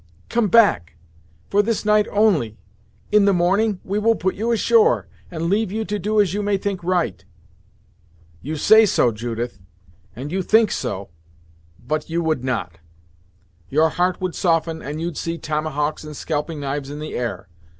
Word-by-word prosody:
"Come 235 -2 +1
back 180 - +3 0.6
for 205 - +4
this 220 0 -2
night 210 0 +3
only; 185 - +2 0.5
in 210 -1 +5
the 200 - +4
morning, 195 +3 +1
we 200 +2 -2
will 225 +2 +3
put 190 -2 -1
you 225 +3 -2
ashore, 450 - +3 0.2
and 165 -1 -3
leave 205 +2 +1
you 220 +1 -2
to 210 +3 -3
do 210 +3 0
as 195 -4 +3
you 205 - -1
may 205 -1 +1
think 190 -2 -4
right." 175 - -1 1.2
"You 155 +3 -4
say 220 +8 +6
so, 125 -9 +3
Judith, 115 0 -5 0.6
and 135 +5 -6
you 190 +2 -1
think 220 +3 +3
so; 100 -6 -4 0.8
but 155 +1 -2
you 170 +1 -1
would 155 -6 0
not. 90 -10 -3 0.9
Your 155 +3 +3
heart 180 +2 0
would 185 -2 -3
soften, 165 -2 0
and 150 +2 -5
you'd 170 -1 -4
see 165 0 -3
tomahawks 155 -1 -2
and 150 -2 -9
scalping 155 0 -3
knives 140 0 -4
in 145 - -6
the 155 +1 -6
air. 120 -6 -4
170 Hz, 170 wpm, -21 LUFS, 150-205 Hz, 1.2 s, say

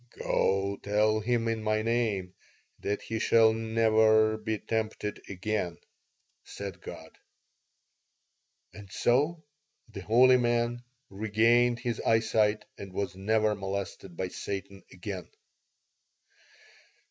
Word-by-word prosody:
"'Go 100 +1 0
tell 105 +1 +2
him 115 +1 0
in 115 -1 -1
My 110 0 0
name 110 -6 -1 0.5
that 105 +1 -3
he 110 0 -3
shall 110 0 +5
never 110 -1 +3
be 110 0 -3
tempted 110 -1 -3
again,' 95 -2 -2 0.7
said 100 -3 -8
God - - -10 1.5
"And 100 -2 -12
so 150 - +1 0.4
the 105 -3 -9
holy 125 +6 +5
man 120 0 0 0.3
regained 115 +4 +2
his 120 -3 -2
eyesight 110 -1 +2
and 100 -1 -8
was 95 -2 -3
never 110 +2 +1
molested 95 -3 -5
by 95 - -2
Satan 100 +1 -6
again." 95 -1 -7
110 Hz, 105 wpm, -29 LUFS, 100-115 Hz, 1.5 s, shall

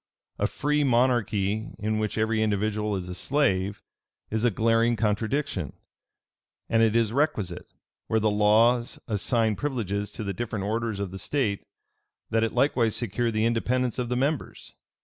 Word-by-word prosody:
A - - +2
free 150 +1 0
monarchy 115 -5 +1
in 110 +1 -1
which 105 0 -2
every 110 0 +1
individual 105 0 0
is 90 -2 -4
a 90 - -5
slave, 100 -5 0 0.5
is 110 +1 0
a 120 - +5
glaring 115 +2 +2
contradiction: 110 - -1 0.9
and 115 - +2
it 110 -1 +3
is 115 -2 +2
requisite, 105 - -1 0.4
where 110 - +2
the 110 0 +2
laws 115 +4 +3
assign 110 0 +1
privileges 105 -8 -2
to 110 - -5
the 100 -1 -3
different 110 -2 -3
orders 110 -1 -2
of 100 -3 -3
the 95 - -7
state, 110 -3 -1 0.6
that 115 0 +2
it 115 - -1
likewise 125 -4 +2
secure 120 +1 -1
the 110 0 0
independence 120 +2 0
of 120 -1 -2
the 125 - 0
members. 140 +3 -2
110 Hz, 155 wpm, -26 LUFS, 105-120 Hz, 0.9 s, a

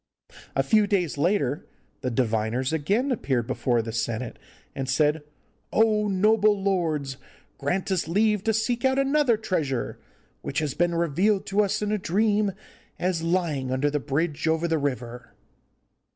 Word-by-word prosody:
A - - +2
few 215 -2 +3
days 180 -6 0
later 145 -3 0 0.3
the 125 - -1
diviners 115 +2 0
again 205 - +1
appeared 130 - 0
before 120 -1 0
the 115 - -5
senate, 115 +1 -3 0.3
and 135 -1 -4
said, 150 +3 +2 0.5
'Oh, 215 -1 +3
noble 210 +1 +3
lords, 160 -9 -1 0.4
grant 175 +8 -1
us 185 -4 0
leave 210 +3 +2
to 225 - +3
seek 235 +2 0
out 265 0 +3
another 275 -3 +3
treasure, 160 - -2 0.4
which - - -5
has 150 -4 0
been 175 +2 +1
revealed 180 +5 +1
to 200 +2 +2
us 205 0 0
in 210 - -1
a 215 - 0
dream 205 +2 +1 0.4
as 180 -2 -1
lying 165 -6 0
under 135 +3 +1
the 150 - 0
bridge 150 +3 -1
over 160 +1 +1
the 160 -1 +1
river. 125 -4 -4
170 Hz, 150 wpm, -25 LUFS, 140-210 Hz, 0.5 s, few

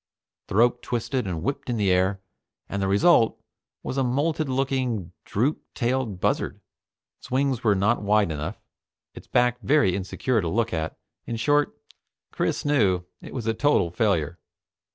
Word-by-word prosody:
The - - -5
rope 120 +2 +4
twisted 120 -1 -2
and 85 -3 -3
whipped 140 +2 -3
in 120 - 0
the 100 -3 +2
air, 95 +1 +2 0.5
and 100 - -3
the 95 - +1
result 115 - +4 0.4
was 135 - -2
a - - +3
molted 145 +5 0
looking, 130 -8 -1
droop 130 +9 0
tailed 120 -6 -1
buzzard. - - 0 0.6
Its - - -13
wings 130 -1 0
were 105 -3 +4
not 105 +5 +2
wide 105 -3 +2
enough, 75 0 -4 0.5
its - - -12
back 125 0 +2
very 135 -11 +3
insecure 105 +5 -1
to 85 - -2
look 115 +5 0
at. 80 -1 -3 0.3
In 115 - -2
short, 145 +6 +1 0.5
Chris - - -1
knew, 105 -12 +2 0.2
it - - -10
was 120 -4 -4
a 115 - +1
total 115 - +2
failure. 85 -5 0
115 Hz, 160 wpm, -25 LUFS, 95-130 Hz, 0.6 s, rope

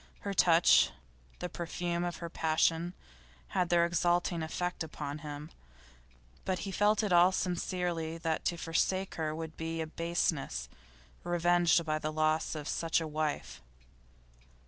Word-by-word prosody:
Her 200 - -3
touch, 170 -2 +6 0.5
the 180 - -4
perfume 175 0 -3
of 175 -1 -2
her 170 - -6
passion, 165 +2 +1 0.5
had 180 - 0
their 170 -1 +4
exalting 175 0 +1
effect 180 +2 -2
upon 150 -2 -5
him. 150 +1 -7 1.1
He 195 +3 -5
felt 210 +3 +3
in 200 -4 +1
all 175 +2 +7
sincerity 175 -3 -2
that 165 -1 -2
to 170 - 0
forsake 185 +4 0
her 155 -1 -2
would 160 0 -6
be 165 0 -3
a 160 - -1
baseness, 165 -2 -1 0.6
revenged 175 -1 +3
by 155 -1 0
the 155 0 -2
loss 155 +1 +1
of 150 -2 -5
such 165 0 +1
a 165 - -3
wife. 155 -1 -3
170 Hz, 140 wpm, -31 LUFS, 160-175 Hz, 1.1 s, all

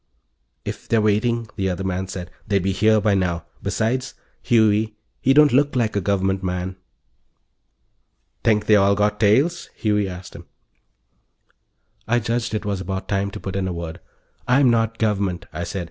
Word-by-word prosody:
"If - - -6
they're 115 - +3
waiting," 110 +2 +1
the 95 -2 0
other 90 +1 -3
man 95 0 -2
said, 90 -1 -7 0.2
"they'd 100 -3 +1
be 95 - +1
here 110 +3 +3
by 105 -1 +2
now. 90 -3 0 0.2
Besides, 115 +6 -1 0.3
Huey, 110 -2 +2 0.3
he 135 - +3
don't 150 0 +6
look 145 +1 +3
like 115 -4 0
a 100 - +1
Government 95 0 0
man." 90 0 -3 1.7
"Think 105 -2 +2
they 105 - +5
all 100 0 +4
got 105 +1 +1
tails?" 135 +12 +2
Huey 105 -2 0
asked 90 0 -9
him. - - -11 1.6
I 120 +2 +2
judged 115 0 -1
it 110 - -3
was 100 -2 -2
about 95 +1 -4
time 100 0 0
to - - -8
put 95 -1 -6
in 95 -1 -1
a 90 - -3
word. 85 -1 -6 0.5
"I'm 125 0 +5
not 115 -1 +1
Government," 100 -5 -1
I 85 +3 -4
said. 95 - -4
105 Hz, 170 wpm, -22 LUFS, 95-115 Hz, 1.7 s, don't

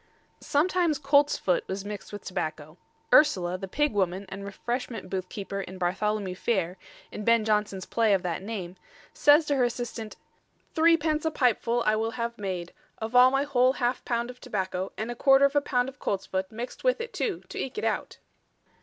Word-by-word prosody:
Sometimes 335 +1 +1
coltsfoot 280 - +2
was 190 +1 -4
mixed 205 -2 -7
with 205 -1 -8
tobacco. 155 -4 -4 0.4
Ursula, 185 - +5
the 195 - -5
pig 295 +7 0
woman 190 -1 0
and 195 +1 -7
refreshment 230 +1 -4
booth 185 -1 -3
keeper 200 -1 -5
in 190 0 -8
Bartholomew 190 +2 -1
Fair, 185 -2 -1 0.3
in 210 - -6
Ben 230 0 +3
Jonson's 210 -3 0
play 225 -2 +2
of 190 - -2
that 175 -1 -2
name, 190 -4 -6 0.4
says 295 +2 +5
to 290 - +1
her 255 - +3
assistant: 240 -2 -3 0.6
"Threepence 320 -2 +3
a 320 - +2
pipe 250 -7 +2
full 235 0 0
I 215 - +3
will 225 +1 0
have 235 0 -2
made, 185 -3 -4 0.2
of 225 +2 -5
all 250 +1 +8
my 270 +1 +1
whole 260 -2 +3
half 245 -1 -1
pound 235 0 -1
of 250 - -18
tobacco 190 -5 -3
and 220 +2 -3
a - - -5
quarter 270 +2 +5
of 280 +1 +1
a 290 - +4
pound 250 -3 0
of 270 +1 -9
coltsfoot 190 -1 -2
mixt 235 +3 -7
with - - +2
it 470 +1 -6
too 420 -6 -2
to - - -6
eke 265 - -4
it 430 - -3
out." - - -2
225 Hz, 190 wpm, -27 LUFS, 190-270 Hz, 0.6 s, all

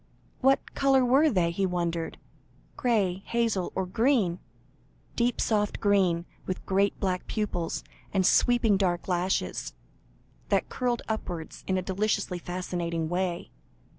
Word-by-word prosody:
What 270 +1 +2
colour 270 -2 +3
were 275 +6 +5
they? 180 - +2
he 190 +3 0
wondered 170 -2 -2 0.6
grey, 200 -7 +1
hazel, 230 -6 0
or 190 - 0
green 220 -3 +2 0.8
deep 240 0 +1
soft 210 -2 +1
green 190 -5 +2 0.2
with 185 - -4
great 195 +1 +1
black 185 -2 -1
pupils, 190 -6 -2 0.3
and 190 -2 +2
sweeping 230 -1 +4
dark 175 -3 0
lashes, 180 +1 -1 0.7
that - - +1
curled 245 -2 -1
upwards 175 -7 -5
in 190 - +1
a 185 - -1
deliciously 190 -1 -1
fascinating 170 -2 -3
way. 175 0 -2
190 Hz, 125 wpm, -28 LUFS, 175-225 Hz, 0.8 s, were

